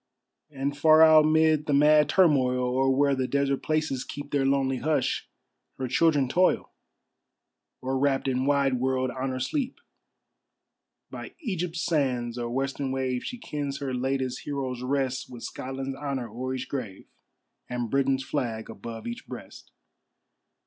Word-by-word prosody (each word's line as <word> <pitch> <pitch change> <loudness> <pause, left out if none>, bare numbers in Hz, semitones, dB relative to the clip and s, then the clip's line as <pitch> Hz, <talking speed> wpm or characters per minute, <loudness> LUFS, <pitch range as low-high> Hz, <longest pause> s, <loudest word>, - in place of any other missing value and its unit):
And 140 0 -3
far 155 +2 +6
out 155 -1 +7
mid 155 -1 +3
the 145 - +2
mad 150 +1 +5
turmoil, 140 -9 +4
Or 130 +2 +1
where 140 +1 +3
the 130 -1 -1
desert 140 0 0
places 155 -4 -1
keep 145 0 -8
Their 140 -2 +2
lonely 135 -1 +1
hush, 155 +4 -1 0.5
her 130 - -3
children 145 0 +3
toil, 180 +8 +2 1.1
Or 130 +1 -1
wrapt 135 -1 +1
in 130 0 0
wide 140 -3 +2
world 130 0 0
honor 130 0 -3
sleep. 255 - -2 1.3
By - - -8
Egypt's 180 - -3
sands 125 -7 0
or 120 -1 -3
western 135 +2 -2
wave, 130 -1 -1
She 245 - -5
kens 145 - -4
her 135 -2 -4
latest 130 0 -1
heroes 130 -4 -4
rest, 130 0 -1
With 120 -2 -10
Scotland's 135 +1 -5
honor 135 -3 -3
o'er 130 +4 -4
each 130 - -5
grave, 115 -9 -5 0.6
And 120 -2 -3
Britain's 135 -1 +1
flag 115 -6 -3
above 115 +1 -8
each 235 +2 -6
breast. - - -10
135 Hz, 145 wpm, -27 LUFS, 130-145 Hz, 1.3 s, out